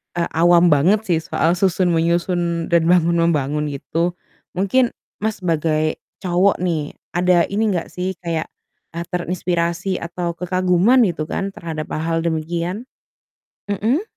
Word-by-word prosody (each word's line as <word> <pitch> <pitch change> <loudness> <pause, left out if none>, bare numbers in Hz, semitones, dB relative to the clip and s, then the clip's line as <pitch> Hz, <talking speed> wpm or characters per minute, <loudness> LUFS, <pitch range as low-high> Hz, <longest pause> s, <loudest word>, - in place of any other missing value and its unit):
eee, 170 -1 -1
awam 170 +1 +5
banget 185 +10 +3
sih 170 -6 +1
soal 165 +1 0
susun 180 0 +1
menyusun 170 0 0
dan 165 -1 +3
bangun 170 -1 +3
membangun 150 -2 +1
gitu. 165 +5 -2 0.4
Mungkin, 230 +7 +1 0.2
Mas, 215 -3 -3
sebagai 155 -2 0 0.2
cowok 185 +2 +3
nih, 160 -5 -2 0.2
ada 175 -1 +3
ini 215 +2 +1
nggak 170 - -4
sih 185 +1 -3
kayak, 165 -2 -2 0.5
eee, 170 - -3
terinspirasi 175 +1 -1
atau 170 0 -3
kekaguman 185 +7 +3
gitu 165 -5 -1
kan 195 0 -3
terhadap 160 -4 -6
hal-hal 165 +1 -1
demikian? 170 +7 -2 0.8
Mhm. 230 - +1
170 Hz, 130 wpm, -20 LUFS, 165-185 Hz, 0.8 s, awam